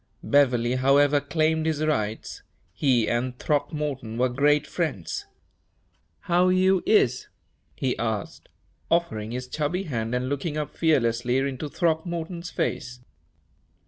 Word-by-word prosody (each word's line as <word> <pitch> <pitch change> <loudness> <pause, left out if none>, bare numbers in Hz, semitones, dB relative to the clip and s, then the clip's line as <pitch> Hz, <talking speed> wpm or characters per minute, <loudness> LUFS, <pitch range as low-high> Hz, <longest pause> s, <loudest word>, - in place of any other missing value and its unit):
Beverley, 125 -3 +3
however, 140 +2 +4
claimed 160 +2 0
his 155 -1 0
rights. 110 -8 -2 0.3
He 120 0 +2
and 125 +1 -1
Throckmorton 145 -6 -2
were 125 +1 +2
great 145 +4 +2
friends. 145 - -3 0.9
"How 180 +1 +2
you 185 0 +3
is?" 125 - +3 0.5
he 130 -2 -1
asked, 110 -3 -4 0.4
offering 165 -11 0
his 125 +2 -5
chubby 155 +7 -2
hand 115 -7 -3
and 125 +1 -1
looking 145 +3 -2
up 150 -1 -4
fearlessly 125 -5 +2
into 135 +2 -2
Throckmorton's 170 +1 -2
face. 125 -5 -3
145 Hz, 115 wpm, -25 LUFS, 125-160 Hz, 0.9 s, however